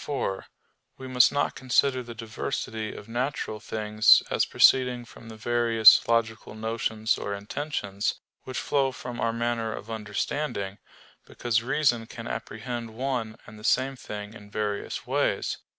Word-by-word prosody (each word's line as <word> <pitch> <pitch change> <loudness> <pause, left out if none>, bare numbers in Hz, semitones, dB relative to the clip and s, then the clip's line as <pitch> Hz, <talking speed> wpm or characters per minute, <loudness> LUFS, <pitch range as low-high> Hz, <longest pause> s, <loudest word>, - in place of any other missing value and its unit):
4: 115 -9 -3 0.5
We 130 - -8
must 125 -1 +5
not 145 - 0
consider 130 0 +2
the 120 -1 -9
diversity 110 -1 -4
of 105 - -10
natural 120 -2 -2
things 110 0 +4
as - - +2
proceeding 125 -2 +4
from 115 0 -13
the 110 - -9
various 115 -1 +5
logical 115 -2 0
notions 110 0 -1
or 100 - -3
intentions, 100 -2 -3 0.3
which 130 -1 -6
flow 135 -2 +1
from 125 -1 -7
our 115 - +2
manner 115 -1 -1
of 115 - -9
understanding, 105 -1 -3 0.5
because 115 -2 0
reason 120 -2 +1
can 115 -1 -9
apprehend 115 0 -5
one 120 -3 -2
and 105 0 -12
the - - -13
same 130 +3 +2
thing 105 -3 -7
in 105 -3 -13
various 105 -1 -3
ways. - - 0
115 Hz, 145 wpm, -27 LUFS, 110-125 Hz, 0.5 s, must